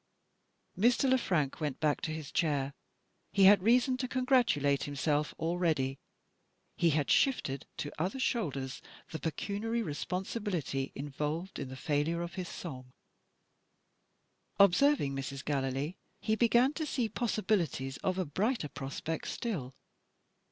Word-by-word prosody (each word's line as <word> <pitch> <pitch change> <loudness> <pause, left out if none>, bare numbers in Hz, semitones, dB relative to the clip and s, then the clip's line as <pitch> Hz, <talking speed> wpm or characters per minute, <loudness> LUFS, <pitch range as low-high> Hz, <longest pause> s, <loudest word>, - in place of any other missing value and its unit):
Mr. 240 +6 +3
Le 260 - +5
Frank 155 - 0
went 145 -4 -2
back 150 -1 +1
to - - -2
his 155 -2 -5
chair. 145 -4 0 0.6
He 200 - +3
had 200 0 +8
reason 250 +5 +4
to 255 0 -2
congratulate 245 - +2
himself 145 +1 0
already: 160 -6 0 0.8
he 170 - +3
had 150 -2 +1
shifted 140 - +2
to 145 - -4
other 190 +9 -1
shoulders 145 - -1 0.3
the 160 - -4
pecuniary 215 +8 -2
responsibility 180 - -3
involved 150 +6 -3
in 130 - -4
the 130 - -7
failure 150 +5 0
of 170 - -6
his 185 -3 -5
Song. 130 -7 -7 1.7
Observing 200 - +5
Mrs. 135 0 -5
Gallilee, 140 +3 -1 0.2
he 220 -1 +1
began 240 +4 +4
to 315 0 -3
see 250 -4 0
possibilities 190 - -1
of 185 -1 -1
a 185 - 0
brighter 190 - -1
prospect 140 +5 -4
still. 150 - -3
165 Hz, 130 wpm, -32 LUFS, 140-220 Hz, 1.7 s, had